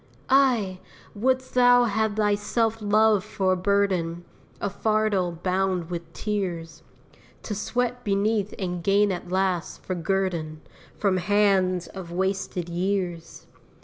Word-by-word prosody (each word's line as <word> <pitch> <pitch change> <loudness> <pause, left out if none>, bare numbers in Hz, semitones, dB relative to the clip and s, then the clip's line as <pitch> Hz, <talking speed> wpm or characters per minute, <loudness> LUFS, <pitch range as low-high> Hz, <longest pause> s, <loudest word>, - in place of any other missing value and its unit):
Ay! 240 -9 +3 0.3
wouldst 260 +4 0
thou 245 0 +6
have 220 -2 0
thy 210 -1 +2
self 225 +2 0
love 210 -1 +3
for 190 -2 0
a - - +1
burden, 185 -3 0 0.3
A - - -1
fardel 205 -3 0
bound 185 -2 0
with 170 -1 -5
tears, 170 -6 -4 0.6
To 215 - -4
sweat 245 +4 -2
beneath 205 0 0
and 180 -3 -3
gain 200 +2 +3
at 180 -1 -5
last, 185 -2 -1
for 185 - -2
guerdon, 170 -3 -2 0.4
From 195 -3 +1
hands 190 -2 +2
of 185 -3 -9
wasted 190 -1 -2
years? 175 -1 -3
195 Hz, 125 wpm, -25 LUFS, 180-215 Hz, 0.6 s, thou